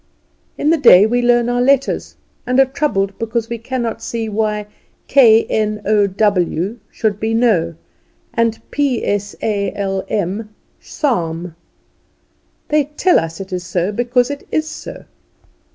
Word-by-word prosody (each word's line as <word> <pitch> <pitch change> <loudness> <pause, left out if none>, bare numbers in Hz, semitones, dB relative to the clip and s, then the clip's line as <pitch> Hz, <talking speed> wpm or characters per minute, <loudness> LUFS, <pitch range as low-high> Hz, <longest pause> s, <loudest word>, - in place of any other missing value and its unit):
In 300 - +2
the 330 - +2
day 205 -7 +7
we 245 +3 +1
learn 240 -1 +3
our 245 0 0
letters, 275 +1 +1 0.3
and 250 +1 +2
are 270 - +7
troubled 210 -8 -1
because 230 0 -2
we 235 -1 -4
cannot 230 -1 -3
see 225 -1 -3
why 210 0 -1 0.4
k 230 -5 +6
n 215 -1 -1
o 205 -1 +3
w 195 +1 0
should 210 -2 -2
be 225 +1 -1
know, 185 -9 +2 0.6
and 230 -1 0
p 280 -5 0
s 205 0 -2
a 205 -2 0
l 195 -1 -2
m 205 +2 -2 0.3
psalm. 175 - -2 1.1
They 300 -1 +2
tell 300 +5 +2
us 165 0 -5
it 190 -1 -7
is 180 -1 -3
so 180 +1 -1
because 245 +3 +1
it 285 - -8
is 310 0 0
so. - - -9
220 Hz, 150 wpm, -17 LUFS, 200-245 Hz, 1.1 s, day